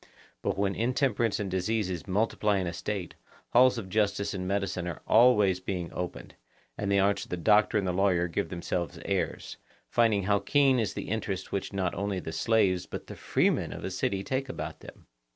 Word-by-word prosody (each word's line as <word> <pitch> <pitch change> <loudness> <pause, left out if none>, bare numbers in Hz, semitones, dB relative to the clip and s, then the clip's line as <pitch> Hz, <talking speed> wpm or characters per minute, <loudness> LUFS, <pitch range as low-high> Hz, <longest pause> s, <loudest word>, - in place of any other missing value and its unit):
But - - -1
when 100 0 +1
intemperance 120 -1 +1
and 100 -3 -3
diseases 95 -1 -1
multiply 105 +1 +1
in 95 - -1
a 85 - -3
State, 95 0 -4 0.4
halls 125 +1 +5
of 105 -5 -5
justice 100 0 0
and 90 -1 -4
medicine 95 -2 -1
are 85 - -6
always 105 -6 +5
being 90 -2 -4
opened; 90 -1 -5 0.4
and 100 -1 -2
the 100 - +4
arts 100 +1 +2
of - - -22
the 90 - -3
doctor 105 +4 +4
and 100 - 0
the 90 - 0
lawyer 90 -2 +2
give 95 +4 -2
themselves 85 -1 -3
airs, - - -2 0.3
finding 110 -4 +3
how 100 +1 +2
keen 135 +4 +3
is 110 - -1
the - - -5
interest 100 -3 -3
which 100 - -3
not 95 -3 -1
only 100 -2 -2
the 80 - -6
slaves 100 -2 +2
but - - -7
the - - -9
freemen - - +1
of - - -7
a - - -3
city 95 0 -1
take 135 +4 -2
about - - -5
them. - - -13
100 Hz, 195 wpm, -28 LUFS, 90-110 Hz, 0.4 s, halls